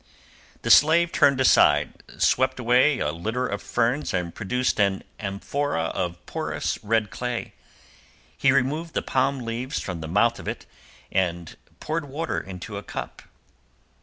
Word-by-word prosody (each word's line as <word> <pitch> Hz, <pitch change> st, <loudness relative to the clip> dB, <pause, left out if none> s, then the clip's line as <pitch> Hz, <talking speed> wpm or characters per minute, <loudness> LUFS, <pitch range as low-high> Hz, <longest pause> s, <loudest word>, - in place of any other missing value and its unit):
The -, -, +2 dB
slave 170 Hz, +4 st, +6 dB
turned 140 Hz, -2 st, +4 dB
aside, 130 Hz, -, +4 dB, 0.2 s
swept 130 Hz, 0 st, +2 dB
away 125 Hz, +4 st, +4 dB
a 75 Hz, -, -1 dB
litter 110 Hz, +10 st, -2 dB
of 100 Hz, -4 st, -3 dB
ferns 120 Hz, +5 st, 0 dB
and 90 Hz, -1 st, -2 dB
produced 125 Hz, +3 st, -1 dB
an 100 Hz, -2 st, +2 dB, 0.2 s
amphora 100 Hz, -, -2 dB
of 85 Hz, -1 st, -4 dB
porous -, -, -3 dB
red 110 Hz, 0 st, +1 dB
clay; 125 Hz, -1 st, -4 dB, 0.8 s
he 135 Hz, -, +3 dB
removed 145 Hz, +5 st, 0 dB
the -, -, 0 dB
palm 135 Hz, 0 st, 0 dB
leaves 120 Hz, +3 st, -3 dB
from 90 Hz, -4 st, -5 dB
the 80 Hz, -, -5 dB
mouth 115 Hz, +7 st, +2 dB
of -, -, -9 dB
it -, -, -5 dB, 0.5 s
and 85 Hz, -3 st, -1 dB, 0.2 s
poured 155 Hz, 0 st, -3 dB
water 150 Hz, +4 st, -3 dB
into 90 Hz, -2 st, -8 dB
a -, -, -6 dB
cup. -, -, -7 dB
120 Hz, 145 wpm, -24 LUFS, 95-135 Hz, 0.8 s, slave